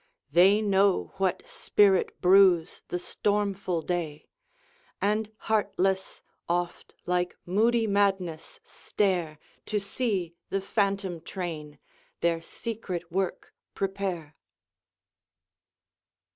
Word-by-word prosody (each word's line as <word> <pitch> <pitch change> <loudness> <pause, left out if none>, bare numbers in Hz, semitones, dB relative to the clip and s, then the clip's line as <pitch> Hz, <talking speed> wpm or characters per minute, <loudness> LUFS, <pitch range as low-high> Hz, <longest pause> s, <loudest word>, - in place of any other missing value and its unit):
They 195 +7 +5
know 195 -1 +2
what 190 -2 -1
spirit 195 -3 +2
brews 180 -2 +5
the 180 - -2
stormful 195 -2 -1
day, 160 -4 -3 0.7
And, 210 +1 0
heartless, 195 -3 0 0.3
oft 175 0 -2
like 180 0 0
moody 225 +5 +2
madness 195 -5 0
stare 175 -6 -1 0.3
To 210 - 0
see 200 -4 -2 0.2
the 195 - 0
phantom 195 -3 -1
train 160 -6 -6 0.4
their 170 -1 +1
secret 180 -3 -5
work 190 +1 -2 0.2
prepare. 190 -6 -3
190 Hz, 90 wpm, -28 LUFS, 175-200 Hz, 0.7 s, They